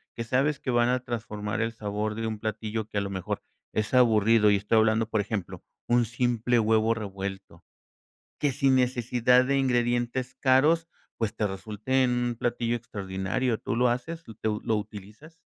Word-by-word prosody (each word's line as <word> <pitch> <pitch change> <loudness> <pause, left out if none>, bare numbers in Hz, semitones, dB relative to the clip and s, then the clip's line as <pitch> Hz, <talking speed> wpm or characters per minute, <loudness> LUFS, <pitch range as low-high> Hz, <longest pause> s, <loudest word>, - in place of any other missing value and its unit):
que 115 - -3
sabes 135 +4 +1
que 130 - -2
van 120 0 +3
a 125 0 0
transformar 105 -4 -4
el 115 0 -1
sabor 105 0 -3
de 115 +1 -3
un 110 -1 -3
platillo 110 0 -3
que 105 - -5
a - - -1
lo 100 - -3
mejor 100 +2 -4 0.3
es 110 +3 -2
aburrido? 115 -3 +5
Y 105 - +5
estoy 105 +3 +1
hablando, 110 0 +3
por 110 - 0
ejemplo, 100 -3 -4 0.3
un 120 0 +3
simple 120 0 0
huevo 110 0 +3
revuelto, 100 -3 -7 0.7
que 145 -2 +1
sin 135 0 +2
necesidad 125 0 +3
de 140 0 +1
ingredientes 120 0 0
caros, 150 +5 +3 0.3
pues, 110 -2 -1
te 105 - 0
resulte 110 +7 -1
un 120 -1 0
platillo 120 0 0
extraordinario, 105 +2 -2
¿tú - - -3
lo 125 +1 +3
haces, 160 +8 -3 0.2
lo 105 -1 -1
lo 110 -2 +1
utilizas? 105 - -9
115 Hz, 170 wpm, -27 LUFS, 105-125 Hz, 0.7 s, aburrido